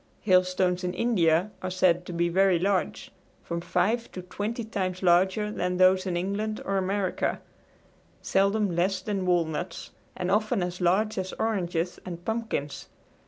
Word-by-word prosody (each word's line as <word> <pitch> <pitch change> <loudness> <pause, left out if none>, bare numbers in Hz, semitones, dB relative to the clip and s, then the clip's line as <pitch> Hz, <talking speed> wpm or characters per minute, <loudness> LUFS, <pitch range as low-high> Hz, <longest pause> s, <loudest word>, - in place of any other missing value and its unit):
Hailstones 185 -1 +2
in 180 0 -2
India 180 -4 +2
are 185 - -3
said 180 -1 +2
to - - -5
be 170 0 +1
very 190 +1 +3
large 190 +2 -1 0.3
from 170 0 -4
five 185 +7 0
to 185 - -6
twenty 210 +6 -4
times 190 -4 -3
larger 190 +4 +3
than 180 -3 -2
those 185 +1 +4
in 175 -2 -1
England 205 +4 -2
or 195 0 0
America 190 0 -1 0.8
seldom 200 -1 +1
less 185 +2 +1
than 190 -1 -3
walnuts 170 0 -1 0.3
and 180 +1 -2
often 215 0 +1
as 180 +1 -5
large 195 +4 +2
as 190 0 -4
oranges 180 -5 -2
and 175 -1 -8
pumpkins. 220 -11 -3
185 Hz, 150 wpm, -27 LUFS, 175-200 Hz, 0.8 s, those